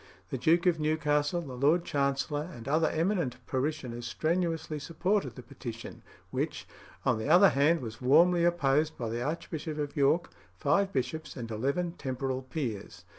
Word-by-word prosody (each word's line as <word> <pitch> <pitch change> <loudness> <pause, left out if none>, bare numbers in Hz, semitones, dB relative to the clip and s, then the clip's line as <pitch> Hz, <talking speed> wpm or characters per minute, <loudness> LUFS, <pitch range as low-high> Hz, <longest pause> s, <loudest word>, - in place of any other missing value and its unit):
The - - -1
Duke 165 +7 +3
of 175 -3 +3
Newcastle, 150 +1 +1
the 140 -6 -8
Lord 150 +7 +2
Chancellor, 145 +2 -1
and 120 -5 -10
other 155 +3 +2
eminent 165 - 0
parishioners 130 -3 -3
strenuously 165 +1 -1
supported 190 +6 -1
the 125 - -9
petition, 115 0 -8 0.3
which, - - -3 0.4
on - - +2
the 110 - -3
other 185 +4 +8
hand, 155 +5 +3
was 115 -1 -7
warmly 170 +7 +5
opposed 155 -2 +2
by 115 -2 -3
the 115 +2 -3
Archbishop 155 +2 -4
of 145 -1 -3
York, 150 +4 +2 0.3
five 195 - +2
bishops, 150 +2 -3
and 115 -2 -6
eleven 140 +10 -1
temporal 130 -4 -3
peers. 115 - -5
150 Hz, 155 wpm, -30 LUFS, 130-165 Hz, 0.4 s, other